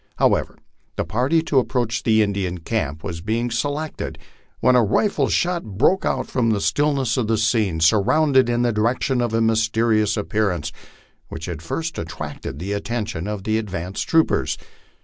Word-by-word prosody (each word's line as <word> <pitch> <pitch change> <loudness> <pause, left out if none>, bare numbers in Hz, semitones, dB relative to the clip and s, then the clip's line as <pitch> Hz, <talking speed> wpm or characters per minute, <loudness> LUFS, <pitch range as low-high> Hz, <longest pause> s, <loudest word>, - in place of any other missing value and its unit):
However, - - +1 0.4
the - - -2
party 130 - +1
to 145 -4 +3
ap 125 - -1
proach 120 -2 -1
the 110 -1 +3
Indian 100 -3 -2
camp 80 -5 -3
was 85 -1 -5
being 115 +5 -1
selected 145 +6 -3 0.4
when 125 +2 +4
a 125 - +5
rifle 200 - +1
shot 175 -1 0
broke 110 - +1
upon 120 -3 0
the 105 -2 +1
stillness 140 -2 +1
of 120 -4 0
the 115 0 +1
scene, 105 -6 +1
sounding 130 - +4
in 120 0 +1
the 120 - +2
direction 120 +4 +1
of 120 - 0
the 115 +1 0
mysterious 110 -1 +2
appearance 100 -7 -1 0.6
which 80 0 -7
had 85 -3 -5
first 165 - -4
attracted 75 -4 -6
the 95 +6 -4
attention 100 -4 -3
of 105 -2 -4
the 110 +1 +1
advanced 95 -3 -4
troopers. 165 -1 +2
110 Hz, 165 wpm, -22 LUFS, 100-125 Hz, 0.6 s, a